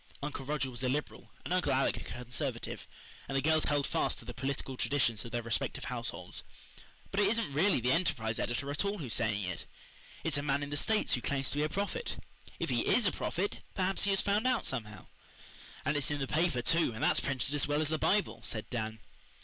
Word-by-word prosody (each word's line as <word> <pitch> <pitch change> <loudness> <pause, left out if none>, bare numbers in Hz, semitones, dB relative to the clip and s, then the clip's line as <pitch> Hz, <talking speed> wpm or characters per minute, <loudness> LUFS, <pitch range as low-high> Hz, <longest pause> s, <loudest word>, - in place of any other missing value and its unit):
Uncle 145 -2 -3
Roger 140 -1 -1
was 120 +1 -3
a 130 - +2
Liberal 145 +3 -3 0.2
and - - -1
Uncle 180 -6 +2
Alec 135 0 +3
a - - -5
Conservative, 125 0 -4 0.4
and 135 - 0
the - - +2
girls 155 0 +4
held 145 -2 +2
fast - - +1
to - - -11
the 120 - -6
political 135 0 -3
traditions 120 -5 +2
of 115 - -8
their 120 -1 -1
respective 115 -1 -1
households. - - -4 0.7
"But 195 - 0
it 205 - +5
isn't 225 -10 +1
really 175 +3 +4
the 125 +2 +2
Enterprise 115 -10 +1
editor 140 +4 -1
at 145 - 0
all 200 +1 -1
who 160 - -5
is 115 - -2
saying 105 -3 +1
it 90 -3 -4 0.6
it's - - +2
a - - -1
man 145 0 +1
in 145 - -5
the - - -1
States 215 +9 +2
who 125 - +1
claims 135 0 0
to - - -2
be 150 - +3
a 155 - +1
prophet. 205 - -2 0.4
If - - -1
he - - +1
IS 245 - +4
a 190 - +4
prophet 195 +4 -2 0.2
perhaps 190 +1 +2
he - - +2
has 195 -1 +5
found 210 +4 +2
out 255 -3 +2
somehow." 110 -6 -3 0.8
"And 145 +2 +2
it's 145 -2 +2
in 145 -1 -1
the 135 - 0
paper, 155 -3 +1
too, 165 -2 +3
and 110 - -4
that's - - +4
printed 140 0 -1
as 145 - +2
well 145 0 +1
as 150 - -1
the 155 0 0
Bible," 155 - +2
said 110 -2 -3
Dan. 110 -3 -3
140 Hz, 230 wpm, -32 LUFS, 120-165 Hz, 0.8 s, it